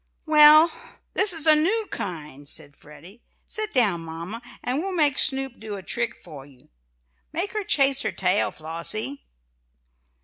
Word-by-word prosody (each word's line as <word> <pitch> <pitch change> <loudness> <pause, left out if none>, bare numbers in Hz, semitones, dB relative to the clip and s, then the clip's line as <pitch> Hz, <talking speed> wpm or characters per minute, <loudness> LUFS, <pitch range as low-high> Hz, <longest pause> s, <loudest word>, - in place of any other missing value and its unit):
"Well, 310 +1 +7 0.4
this 395 +1 +2
is 325 -3 -1
a 310 - +11
new 390 +9 +2
kind," 150 -6 -7
said 145 - -7
Freddie. 160 +11 -16 0.2
"Sit 430 -1 -3
down, 205 -10 +2
mamma, 165 +7 -8 0.2
and 250 +3 -2
we'll 380 +3 -4
make 295 -5 +2
Snoop 270 -3 +1
do 215 -1 -7
a 195 - -9
trick 235 +4 -2
for 140 -3 -12
you. 135 -2 -19 0.7
Make 365 +5 -4
her 425 -1 -3
chase 275 -6 +2
her - - -2
tail, 185 +2 0
Flossie." 170 - -5
245 Hz, 150 wpm, -23 LUFS, -, 0.7 s, a